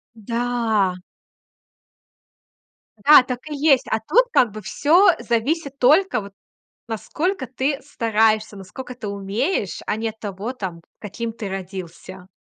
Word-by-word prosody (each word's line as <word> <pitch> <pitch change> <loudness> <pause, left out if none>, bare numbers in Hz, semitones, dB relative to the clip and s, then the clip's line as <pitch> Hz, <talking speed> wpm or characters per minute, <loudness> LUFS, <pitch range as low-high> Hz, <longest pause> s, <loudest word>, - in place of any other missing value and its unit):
Да. 225 -4 0 2.1
Да, 295 -3 +9
так 250 -1 -4
и 300 - -4
есть. 280 -2 +3
А 220 - +1
тут 370 - +3
как 245 - +3
бы 215 +1 -8
всё 295 - +4
зависит 275 +5 -1
только 300 - +4
вот 200 0 -11 0.5
насколько 260 - -2
ты 265 +3 -2
стараешься, 220 -5 +1
наскока 210 +7 -9
ты 220 -4 -7
умеешь, 200 - -2
а - - 0
не 225 +1 -2
от 220 0 -12
того, 205 +4 -5
там, 185 -8 -6 0.2
каким 225 +3 -5
ты 220 -2 -6
родился. 185 -1 -8
225 Hz, 130 wpm, -22 LUFS, 205-265 Hz, 2.1 s, Да